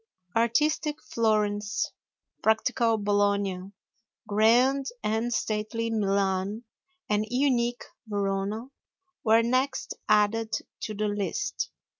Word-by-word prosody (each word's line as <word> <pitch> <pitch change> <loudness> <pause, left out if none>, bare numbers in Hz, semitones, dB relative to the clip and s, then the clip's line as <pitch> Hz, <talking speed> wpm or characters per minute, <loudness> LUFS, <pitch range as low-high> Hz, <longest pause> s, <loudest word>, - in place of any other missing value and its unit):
Artistic 300 +6 +1
Florence, 210 -2 0 0.5
practical 225 +1 +2
Bologna, 200 -2 0 0.6
grand 245 +6 +4 0.2
and 220 +3 0
stately 225 +1 -1
Milan, 200 0 0 0.4
and 210 0 +1
unique 245 -2 +1 0.2
Verona 205 +4 -2 0.5
were 225 0 +5
next 255 +3 0 0.2
added 220 +1 +3 0.2
to 215 - -5
the 210 +1 0
list. 205 - -2
220 Hz, 85 wpm, -27 LUFS, 205-235 Hz, 0.6 s, were